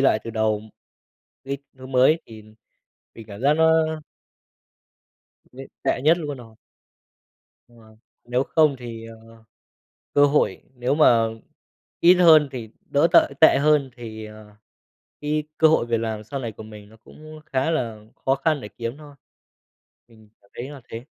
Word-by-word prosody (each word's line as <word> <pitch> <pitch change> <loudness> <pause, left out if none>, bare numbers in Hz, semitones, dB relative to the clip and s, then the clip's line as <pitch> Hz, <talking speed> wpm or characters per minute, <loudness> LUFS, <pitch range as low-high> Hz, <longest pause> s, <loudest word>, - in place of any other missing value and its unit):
lại 135 -5 +3
từ 115 - -5
đầu 110 -1 0 0.8
cái 140 +1 -4 0.2
thứ 130 - -10
mới 130 +5 +3
thì 110 -1 -12
thì 110 0 -19 0.6
mình 115 - -12
cảm 100 -1 -10
giác 145 +2 +4
nó 160 +1 +4 1.8
Vậy 135 +1 -11
tệ - - 0
nhất 160 +4 +4
luôn 145 -4 -5
rồi. 115 -2 -14 1.1
Ờ, 120 - -23 0.5
nếu 125 +1 0
không 155 -2 +2
thì, 115 -2 -8
ờ, 115 0 -14 0.8
cơ 145 0 +5
hội 145 +1 0
nếu 125 +3 -1
mà 120 -7 +4 0.7
ít 175 +2 +7
hơn 160 -5 +6
thì 120 -4 -7 0.2
đỡ 145 +3 +2
tợi - - +5
tệ 160 - +7
hơn 150 -2 +2
thì, 110 -2 -8
à, 105 -1 -14 0.6
cái 150 +1 -1
cơ 160 - +6
hội 155 -6 +2
việc 120 -1 0
làm 110 -2 -4
sau 135 +6 -6
này 120 -3 -5
của 110 - -11
mình 105 -1 -13
nó 110 - -18
cũng 155 0 -13
khá 135 +2 -1
là 115 -9 -2 0.3
khó 135 - +3
khăn 145 +1 0
để 105 - -7
kiếm 115 +5 -6
thôi. 145 -2 -14 0.9
Mình 110 -2 -21
cảm 100 - -29
thấy 125 +3 -6
là 145 -2 -11
thế. 115 +2 -8
125 Hz, 165 wpm, -23 LUFS, 110-150 Hz, 1.8 s, ít